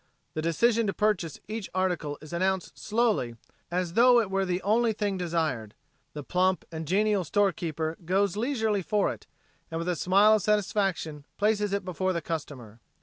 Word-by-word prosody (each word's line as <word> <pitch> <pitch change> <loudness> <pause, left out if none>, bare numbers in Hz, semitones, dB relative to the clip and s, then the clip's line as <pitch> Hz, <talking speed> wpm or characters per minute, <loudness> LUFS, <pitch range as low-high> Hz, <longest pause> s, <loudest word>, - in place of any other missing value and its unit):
The 155 - -2
decision 225 +8 +2
to 195 - 0
purchase 205 -7 0
each 215 -1 -5
article 175 -6 -1
is 155 - -10
announced 185 +1 -1
slowly 215 - 0 0.3
and 175 +1 0
as 175 -2 -3
tho 245 +3 +6
it 210 -4 -1
were 195 0 +1
the 180 0 0
only 225 +2 +2
thing 205 -2 -1
desired. 160 - -2 0.4
The 150 - -6
plump 185 +5 +1
and 160 -1 -5
genial 205 +2 +2
storekeeper 165 -3 0
goes 190 +2 +1
leisurely 220 -3 0
for 205 +3 +1
it, - - -15 0.4
and 165 - -4
with 165 +1 -3
a 180 - +1
smile 200 +6 +5
of 215 - +3
satisfaction 195 -8 0
places 210 -1 +1
it 200 -1 -1
before 185 +1 -1
the 170 - -2
customer. 140 -9 -6
185 Hz, 175 wpm, -28 LUFS, 165-210 Hz, 0.4 s, tho